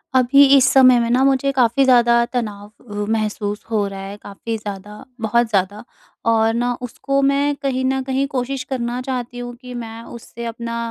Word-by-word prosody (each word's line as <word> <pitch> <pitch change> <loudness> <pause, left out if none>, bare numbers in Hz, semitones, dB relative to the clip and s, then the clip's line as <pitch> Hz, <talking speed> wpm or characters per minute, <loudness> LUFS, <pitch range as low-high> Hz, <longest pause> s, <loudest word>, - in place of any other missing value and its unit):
अभी 260 +3 +6
इस 265 -1 +5
समय 255 -2 +6
में 235 - 0
ना, 250 +2 +3
मुझे 275 0 +2
काफ़ी 260 0 +2
ज़्यादा 235 -2 +4
तनाव 210 -4 -3 0.2
अ, - - -8 0.2
महसूस 210 -1 -2
हो 210 -2 +1
रहा 195 0 -7
है। 195 +1 -7
काफ़ी 225 +3 -6
ज़्यादा, 205 0 -8 0.2
बहुत 235 +2 +2
ज़्यादा 200 0 -1 0.5
और 225 0 +3
ना 245 +1 0
उसको 275 +3 -2
मैं 280 +1 +1
कहीं 270 -2 -2
न 265 0 0
कहीं 265 +1 -1
कोशिश 265 0 -3
करना 245 -2 -3
चाहती 250 -2 -5
हूँ 245 0 -7
कि 250 0 -11
मैं 230 -1 -7
उससे 235 0 -10
अपना 235 0 -5
240 Hz, 180 wpm, -20 LUFS, 225-260 Hz, 0.5 s, अभी